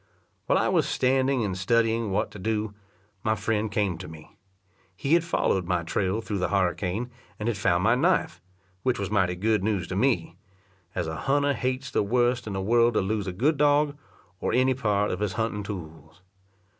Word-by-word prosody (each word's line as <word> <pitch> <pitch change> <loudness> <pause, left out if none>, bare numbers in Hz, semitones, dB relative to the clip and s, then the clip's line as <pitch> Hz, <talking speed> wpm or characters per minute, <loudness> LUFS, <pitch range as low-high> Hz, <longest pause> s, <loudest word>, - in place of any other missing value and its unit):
While - - +3
I - - +2
was - - +2
standing 130 -1 +2
and 95 -2 -2
studying 115 +3 +1
what 95 - 0
to 105 - -10
do, 105 +1 -2 0.5
my 110 +1 +1
friend 110 0 -1
came 95 -5 0
to 90 - -7
me. 80 -1 -13 0.6
He 140 - 0
had 170 0 +5
followed 95 - 0
my 90 -2 0
trail 95 +5 -1
through 105 -3 -3
the 90 - 0
harricane, 95 +4 -1 0.3
and 105 - -4
had 120 - +1
found 95 -4 +1
my 115 - +4
knife, 165 +9 +1 0.4
which 130 +3 +1
was 100 0 -3
mighty 95 -4 +2
good 105 +2 +1
news 100 -4 0
to 95 - -3
me; 95 -7 +1 0.6
as 90 - -1
a 80 0 -4
hunter 140 - +1
hates 130 +2 -2
the - - +2
worst 120 +2 +1
in 105 - -3
the 95 - -2
world 115 +2 +3
to - - +3
lose 100 +1 -2
a - - -1
good 140 - +1
dog, 145 0 +3 0.4
or - - -1
any 130 +1 +3
part 105 -5 0
of 90 - -3
his 105 -2 -1
hunting 110 0 -2
tools. 80 -4 -9
105 Hz, 195 wpm, -26 LUFS, 95-125 Hz, 0.6 s, had